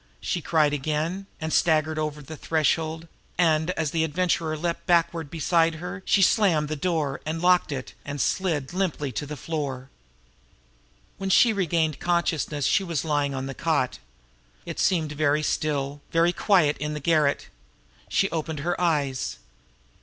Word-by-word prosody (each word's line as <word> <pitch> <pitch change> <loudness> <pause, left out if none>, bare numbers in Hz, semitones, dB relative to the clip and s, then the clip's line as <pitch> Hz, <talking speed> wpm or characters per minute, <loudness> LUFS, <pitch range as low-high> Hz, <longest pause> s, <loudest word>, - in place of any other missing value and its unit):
she 175 - -2
cried 155 -2 +2
again, 155 +7 -2
and 160 -1 -3
staggered 155 -2 +2
over 150 -1 -3
the 155 +3 -8
threshold, 160 +1 0 0.3
and, 160 -1 +3
as 160 -3 -1
the 160 -1 +1
Adventurer 160 -1 0
leaped 170 +4 -3
backward 170 -3 +2
beside 165 +1 +2
her, 180 +4 -6
she 195 - +4
slammed 170 -7 +3
the 155 - -2
door, 155 -4 -1
and 160 +2 -3
locked 180 -1 +3
it 130 -2 -5
and 145 0 -5
slid 160 -1 -1
limply 180 -7 -1
to 135 +5 -4
the 150 0 -6
floor. 140 -3 -4 1.3
When 195 0 -2
she 225 +4 +5
regained 165 -6 0
consciousness 165 -5 0
she 200 - +3
was 170 -5 -2
lying 145 -3 0
on 130 0 -3
the 135 - -5
cot. 65 - 0 0.7
It - - -6
seemed 160 -5 +1
very 150 0 +1
still, 145 -2 -1
very 170 +1 +3
quiet 175 -9 +3
in 150 0 -3
the - - -3
garret. 150 -1 +1 0.6
She 195 - +2
opened 160 -2 -3
her 175 +3 -2
eyes. 145 - 0
155 Hz, 155 wpm, -25 LUFS, 145-170 Hz, 1.3 s, she